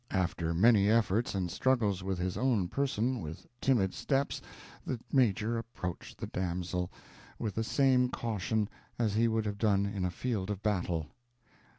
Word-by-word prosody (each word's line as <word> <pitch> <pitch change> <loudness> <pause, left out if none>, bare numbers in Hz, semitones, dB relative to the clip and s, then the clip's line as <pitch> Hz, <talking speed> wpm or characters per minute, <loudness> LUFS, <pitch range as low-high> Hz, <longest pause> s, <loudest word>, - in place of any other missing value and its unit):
After 85 -3 0
many 105 +1 +5
efforts 110 -1 +2
and 90 -3 -1
struggles 110 -8 +2
with 95 0 -2
his 90 +1 -2
own 115 -9 +1
person, 130 -2 0
with 80 0 -7 0.2
timid 105 -8 +3
steps 140 0 0 0.4
the 125 - -3
Major 115 -3 +3
approached 100 -6 -6
the - - -4
damsel, 90 0 -2 0.5
with 105 -3 -3
the 115 - -1
same 130 0 +3
caution 110 -2 -1 0.3
as 110 -4 +1
he 115 +2 +3
would 110 -1 0
have 100 -1 -3
done 100 -3 +3
in 100 -2 -2
a 90 - +1
field 105 +1 -2
of 105 -1 -3
battle. 90 -6 0
105 Hz, 160 wpm, -31 LUFS, 95-115 Hz, 0.5 s, many